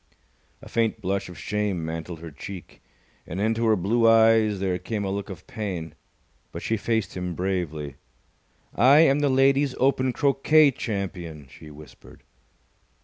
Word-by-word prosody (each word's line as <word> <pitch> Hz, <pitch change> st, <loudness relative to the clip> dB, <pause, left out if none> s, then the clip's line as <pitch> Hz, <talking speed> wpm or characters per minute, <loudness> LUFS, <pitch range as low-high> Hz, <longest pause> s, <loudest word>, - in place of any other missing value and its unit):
A -, -, -11 dB
faint 115 Hz, -1 st, 0 dB
blush 100 Hz, -1 st, -2 dB
of 90 Hz, -, -11 dB
shame 100 Hz, -2 st, -2 dB
mantled 80 Hz, +1 st, -6 dB
her 85 Hz, -1 st, -8 dB
cheek, 90 Hz, +5 st, -10 dB, 0.5 s
and 90 Hz, -, -5 dB
into 115 Hz, +2 st, +1 dB
her 110 Hz, -, +4 dB
blue 115 Hz, +5 st, +2 dB
eyes 110 Hz, -2 st, +4 dB
there 95 Hz, -2 st, -1 dB
came 100 Hz, +2 st, -4 dB
a 95 Hz, -, -2 dB
look 100 Hz, 0 st, -4 dB
of 95 Hz, -4 st, -9 dB
pain, 90 Hz, -7 st, -5 dB, 0.6 s
but -, -, -7 dB
she 115 Hz, -, 0 dB
faced 110 Hz, -2 st, -2 dB
him 90 Hz, -1 st, -4 dB
bravely. 85 Hz, -6 st, -3 dB, 0.8 s
"I 140 Hz, +5 st, +6 dB
am 145 Hz, -3 st, +4 dB
the 145 Hz, -1 st, +2 dB
Ladies' 135 Hz, +1 st, +3 dB
Open 130 Hz, 0 st, +2 dB
Croquet 140 Hz, +3 st, +4 dB
Champion!" 90 Hz, -, -5 dB
she 75 Hz, -, -13 dB
whispered. 75 Hz, +1 st, -15 dB
100 Hz, 150 wpm, -25 LUFS, 90-115 Hz, 0.8 s, I